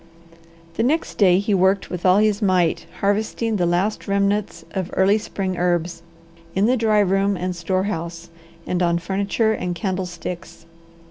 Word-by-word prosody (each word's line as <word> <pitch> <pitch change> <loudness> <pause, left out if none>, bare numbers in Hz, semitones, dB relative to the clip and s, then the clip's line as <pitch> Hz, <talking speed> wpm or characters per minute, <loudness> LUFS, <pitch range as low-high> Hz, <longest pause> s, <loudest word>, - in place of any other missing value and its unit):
The - - +1
next 300 +8 0
day 185 -3 +5
he 205 +2 0
worked 190 +1 +2
with 180 0 -1
all 185 +1 +6
his 210 -1 +2
might 185 -5 +1
harvesting 215 +2 0
the 175 -2 +1
last 180 +5 0
remnants 200 +1 0
of 190 -2 -3
early 195 +3 +4
spring 190 -3 -4
herbs, 175 -1 0 0.5
in 195 +2 +3
the 250 +3 +3
dry 220 -3 +2
room 195 0 +1
and 180 0 -3
store 185 +2 -1
house, 170 -4 -5 0.3
and 180 0 -1
on 170 -1 +2
furniture 200 +5 0
and 180 -4 -3
candlesticks. 180 -2 -5
190 Hz, 155 wpm, -21 LUFS, 175-205 Hz, 0.5 s, all